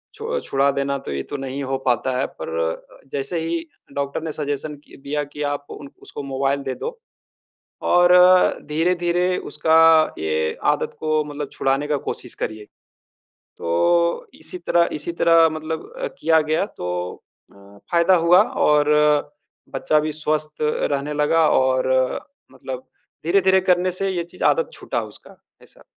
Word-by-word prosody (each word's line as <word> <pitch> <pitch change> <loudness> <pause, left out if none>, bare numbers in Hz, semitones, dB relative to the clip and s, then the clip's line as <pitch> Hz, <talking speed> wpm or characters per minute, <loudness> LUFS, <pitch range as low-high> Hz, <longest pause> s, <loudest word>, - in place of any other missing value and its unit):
छु 470 +2 -3
छुड़ा 140 +1 +2
देना 140 0 -1
तो - - -7
ये 70 -1 -2
तो 145 - -6
नहीं 135 +1 -5
हो 135 0 -2
पाता 125 +1 +1
है, 130 - +1
पर 80 - -8
अ, 80 0 -4
जैसे 140 +5 -3
ही 165 0 -2 0.3
डॉक्टर 140 +2 -3
ने 160 - -3
सजेशन 145 0 -3
कि - - -16
दिया 145 +2 -3
कि 145 +1 -10
आप 145 0 -6
उन 140 - -9
उसको 145 - -8
मोबाइल 140 +1 -1
दे 130 -1 -3
दो, 475 0 -6 0.8
और 175 0 +4 0.6
धीरे-धीरे 175 +3 +1
उसका 160 0 +3 0.4
ये 80 0 -1 0.2
आदत - - -4
को 155 -1 +1
मतलब 145 -1 -6
छुड़ाने 135 +2 0
का 150 -1 +1
कोशिश - - -5
करिए। 110 -1 -5 0.9
तो 170 - +1
इसी - - -9
तरह 170 0 +2
इसी 150 +3 -3
तरह 165 -1 +6
मतलब 155 - -5 0.3
किया 160 -1 +4
गया 155 +4 0
तो - - -5 0.7
अ, - - -22 0.4
फ़ायदा 170 +2 +4
हुआ 180 +3 +7 0.3
और 150 0 +3 0.8
बच्चा 150 +3 +2
भी 155 +1 -2
स्वस्थ 155 0 -2
रहने 150 -1 -1
लगा, 155 +2 +3
और 130 0 +2 0.6
मतलब 130 -1 -8 0.4
धीरे-धीरे 190 +2 +4
करने 180 +1 +2
से 195 +2 -2
ये 180 -2 -2
चीज़ 170 - -9
आदत 485 0 +2
छूटा - - -3
उसका, - - -13 0.2
ऐसा। - - -19
150 Hz, 155 wpm, -21 LUFS, 135-170 Hz, 0.9 s, हुआ